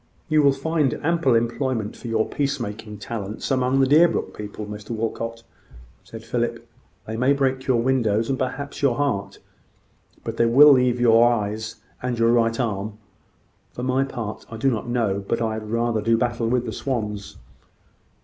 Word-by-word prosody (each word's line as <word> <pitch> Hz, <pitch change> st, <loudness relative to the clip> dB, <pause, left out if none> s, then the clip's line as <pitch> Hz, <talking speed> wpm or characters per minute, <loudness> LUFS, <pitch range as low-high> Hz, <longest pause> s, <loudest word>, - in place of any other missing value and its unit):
"You 155 Hz, -1 st, +4 dB
will 140 Hz, -1 st, +5 dB
find 140 Hz, -1 st, 0 dB
ample 160 Hz, -6 st, +2 dB
employment 115 Hz, -1 st, -1 dB
for -, -, -9 dB
your 110 Hz, -1 st, +1 dB
peace 140 Hz, -1 st, -1 dB
making 105 Hz, -1 st, -6 dB
talents 105 Hz, +1 st, -5 dB
among 130 Hz, +1 st, +2 dB
the -, -, +5 dB
Deerbrook 155 Hz, +6 st, +3 dB
people, 105 Hz, 0 st, -7 dB
Mr 105 Hz, 0 st, -9 dB
Walcot," 115 Hz, 0 st, -3 dB, 0.6 s
said -, -, -10 dB
Philip. -, -, -2 dB, 0.4 s
"They 110 Hz, -, -5 dB
may 130 Hz, +4 st, +3 dB
break 130 Hz, -1 st, -1 dB
your 125 Hz, -3 st, +3 dB
windows, 115 Hz, -4 st, +1 dB
and 135 Hz, -1 st, -1 dB
perhaps 140 Hz, +2 st, -4 dB
your 135 Hz, -4 st, +3 dB
heart; 100 Hz, -8 st, -1 dB, 0.9 s
but -, -, -5 dB
they 115 Hz, -, +3 dB
will 145 Hz, +5 st, +8 dB
leave 125 Hz, -2 st, +4 dB
you 120 Hz, -1 st, +4 dB
your 115 Hz, +1 st, +6 dB
eyes 110 Hz, -1 st, -3 dB, 0.3 s
and 125 Hz, -1 st, -2 dB
your 115 Hz, 0 st, +3 dB
right 115 Hz, 0 st, +2 dB
arm. 105 Hz, -3 st, -2 dB, 0.8 s
For 125 Hz, -, -6 dB
my 130 Hz, +1 st, +1 dB
part, 115 Hz, -6 st, -5 dB
I 115 Hz, -, -7 dB
do 135 Hz, +4 st, +2 dB
not 115 Hz, 0 st, -3 dB
know 110 Hz, -5 st, 0 dB
but 115 Hz, -, 0 dB
I 110 Hz, -1 st, -1 dB
had 110 Hz, -1 st, -6 dB
rather 115 Hz, -1 st, 0 dB
do 115 Hz, +2 st, +2 dB
battle 120 Hz, -1 st, -1 dB
with 125 Hz, +1 st, +1 dB
the -, -, -4 dB
swans." 105 Hz, -6 st, -4 dB
120 Hz, 180 wpm, -23 LUFS, 110-130 Hz, 0.9 s, will